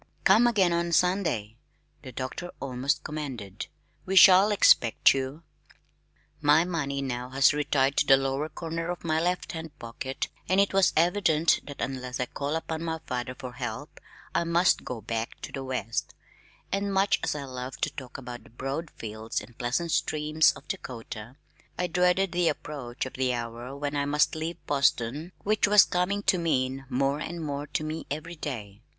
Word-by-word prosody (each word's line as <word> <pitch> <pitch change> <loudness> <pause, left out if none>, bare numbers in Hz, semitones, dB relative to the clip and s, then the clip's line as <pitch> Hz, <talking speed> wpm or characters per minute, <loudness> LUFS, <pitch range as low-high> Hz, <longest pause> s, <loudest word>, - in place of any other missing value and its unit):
"Come 220 +5 +6
again 195 -7 +3
on 170 0 0
Sunday," 155 - +1 0.4
the 130 - -9
doctor 130 +8 -5
almost 135 +1 -1
commanded. 125 -10 -6 0.4
"We 190 - -3
shall 190 +2 +8
expect 120 - +5
you." 135 +4 -4 1.0
My 150 +3 +5
money 160 -6 -2
had - - -3
now 125 0 -4 0.2
retired 140 -2 +1
to - - +3
the 135 - +8
lower 135 +3 -1
corner 165 +1 -4
of 175 - -4
my 160 -1 +1
left 180 +1 -1
hand 160 -2 -7
pocket 130 +3 -5 0.2
and 185 +1 +3
it 200 0 +3
was 195 -1 +4
evident 170 -2 +3
that 145 -1 -9
unless 130 -1 -4
I 125 - +1
called 140 +4 -3
upon 160 0 -3
my 160 -1 -2
father 125 0 -3
for 130 -2 -7
help 125 - -6 0.3
I - - +2
must 170 +2 +3
go 120 -3 -5
back 115 +2 -4
to - - -7
the 135 - -5
West; 130 -3 -3 0.6
and 200 0 0
much 195 +1 +2
as - - 0
I 145 - -4
loved 130 0 -6
to - - +1
talk 130 -1 -8
of 135 - -11
the 120 -1 -8
broad 135 +7 -4
fields 110 -2 -5
and 110 +3 -13
pleasant 130 +9 -1
streams 155 +1 +3
of 140 +2 -14
Dakota, 115 -1 -7 0.4
I 180 - 0
dreaded 180 +2 +2
the 175 -1 +1
approach 130 -5 -5
of 130 - -7
the 130 -1 0
hour 120 +3 -6
when 145 0 -3
I 145 0 0
must 150 +1 +2
leave 160 +2 -5
Boston, 140 +2 +1
which 215 +1 +2
was 210 0 +7
coming 190 +3 0
to 185 - +3
mean 135 -4 -1
more 135 +2 +1
and 170 +2 -5
more 145 -2 -4
to 155 - -2
me 155 +1 -5
every 155 +4 -5
day. 110 -9 -6
145 Hz, 180 wpm, -27 LUFS, 130-170 Hz, 1.0 s, shall